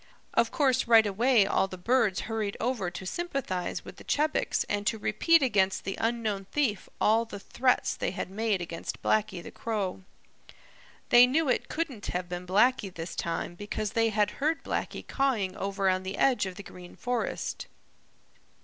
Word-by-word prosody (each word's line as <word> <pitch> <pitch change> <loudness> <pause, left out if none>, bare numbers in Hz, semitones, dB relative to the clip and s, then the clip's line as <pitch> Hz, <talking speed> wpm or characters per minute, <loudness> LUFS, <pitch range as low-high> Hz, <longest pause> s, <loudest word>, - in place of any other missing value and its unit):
Of 230 0 +3
course 260 -4 +2
right 225 -2 +7
away 220 +2 +3
all 195 - +1
the 185 - -8
birds 215 0 +2
hurried 220 -2 -3
over 230 -7 -1
to 175 +2 -8
sympathize 265 - -3
with - - -10
the - - -12
Chebecs 305 +1 0
and 205 0 -2
to 220 - +1
repeat 290 +10 +3
against 195 -6 +2
the 195 - -3
unknown 225 -4 -1
thief 215 -4 -1
all 225 +2 +4
the 215 -3 -8
threats 250 +5 +1
they - - -1
had 185 0 -5
made 210 -2 0
against 170 -1 -6
Blacky 200 -5 +1
the - - -9
Crow. 205 -5 -3 1.1
They 240 +1 +8
knew 295 +3 +1
it 250 - 0
couldn't 285 -10 -3
have 180 0 -2
been 180 0 -6
Blacky 205 +1 +3
this 165 -1 -7
time 170 +1 -3
because 205 +2 -4
they 225 0 +2
had 210 -1 +1
heard 315 +3 +1
Blacky - - -3
cawing 235 -9 0
over 195 0 -1
on 185 0 +2
the 190 +1 -5
edge 255 -7 +3
of 185 - -7
the 200 - -8
Green 180 -1 -12
Forest. 245 -2 -3
210 Hz, 175 wpm, -28 LUFS, 190-245 Hz, 1.1 s, They